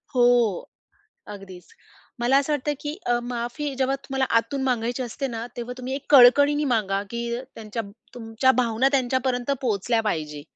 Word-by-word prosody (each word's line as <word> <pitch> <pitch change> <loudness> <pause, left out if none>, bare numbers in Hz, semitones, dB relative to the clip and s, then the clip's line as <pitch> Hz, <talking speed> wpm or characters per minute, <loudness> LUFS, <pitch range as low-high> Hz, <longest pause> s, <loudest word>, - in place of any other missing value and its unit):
हो. 245 - +4 1.1
अगदीच. 190 -3 -11 0.5
मला 245 +3 +3
असं 280 +2 -1
वाटतं 295 0 -1
की 295 +1 -5
अ, 240 0 +2
माफी 245 +4 -4
जेव्हा 265 +1 +1
तुम्हाला 270 -1 -1 0.2
आतून 265 +4 -5
मागायची 245 0 -1
असते 255 +3 -4
ना 230 -1 -5
तेव्हा 245 +1 -5
तुम्ही 255 +1 -4
एक 275 - -6
कळकळीने 285 +3 +6
मागा 195 -3 0
की 235 - -4 0.3
त्यांच्या 225 +1 -5 0.3
तुमच्या 235 +2 +1
भावना 235 +2 +2
त्यांच्यापर्यंत 255 -1 0
पोहचल्या 230 -1 0
पाहिजे. 155 -8 -3
245 Hz, 150 wpm, -24 LUFS, 225-270 Hz, 1.1 s, कळकळीने